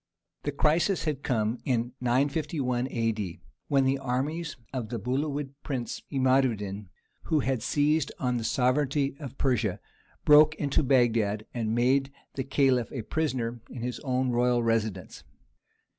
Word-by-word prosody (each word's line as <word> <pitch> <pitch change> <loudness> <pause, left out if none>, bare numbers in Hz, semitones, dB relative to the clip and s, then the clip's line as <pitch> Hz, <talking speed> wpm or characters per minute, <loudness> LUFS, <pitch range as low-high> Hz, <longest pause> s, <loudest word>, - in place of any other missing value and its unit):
The 145 - -2
crisis 160 +6 +2
had 150 -4 -2
come 115 -4 0
in 120 -2 0
951 130 0 0
A.D., 110 -7 -2 0.3
when 135 -1 +3
the 135 +1 +1
armies 140 +6 -2 0.2
of 120 -5 -3
the 120 - -3
Buhawid 140 +5 -2
prince 130 -5 -4
Imad 130 -1 +3
ud 110 - -4
din, 100 -1 -6 0.4
who 155 -2 +2
had 130 -2 -1
seized 150 +3 +1
on 125 -2 0
the 115 - -3
sovereignty 135 +4 +1
of 135 -3 -8
Persia, 120 -8 0 0.5
broke 150 +1 +7
into 145 -2 +1
Bagdad 115 -6 +2
and 115 -2 -1
made 135 +3 +2 0.2
the 135 - -3
Caliph 130 -3 +2
a 125 -5 -4
prisoner 120 -5 -2
in 120 -2 -7
his 125 0 -3
own 130 -2 0
royal 120 0 +2
residence. 110 -5 -1
130 Hz, 145 wpm, -28 LUFS, 120-140 Hz, 0.5 s, broke